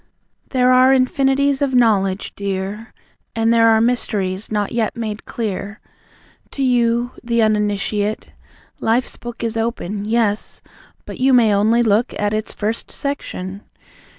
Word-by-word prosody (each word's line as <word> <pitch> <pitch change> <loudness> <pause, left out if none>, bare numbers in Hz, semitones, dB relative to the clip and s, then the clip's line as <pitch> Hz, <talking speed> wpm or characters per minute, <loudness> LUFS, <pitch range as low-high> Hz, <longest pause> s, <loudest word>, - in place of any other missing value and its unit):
There 255 -1 +3
are 255 +1 +6
Infinities 270 +2 +2
of 270 -2 +1
Knowledge, 200 -5 +2
dear. 200 +2 -4 0.4
And 225 0 +2
there 230 0 +5
are 220 -1 +5
mysteries, 215 -5 -1
not 210 -1 -1
yet 230 -2 -1
made 215 -2 -5
clear 205 -2 -4 0.7
To 275 - -2
you, 240 -1 +2
the 235 -1 +1
Uninitiate.... 210 0 -1 0.5
Life's 235 +3 0
book 240 0 -8
Is 230 0 -2
open, 210 -3 -3
yes; 215 -2 -1 0.4
but - - -9
you 265 +1 +3
may 230 -4 +5
only 220 +4 +3
look 220 +2 +1
At 205 0 -1
its 215 0 -2
first 220 +2 -3
section. 200 -9 -5
225 Hz, 135 wpm, -19 LUFS, 205-240 Hz, 0.7 s, are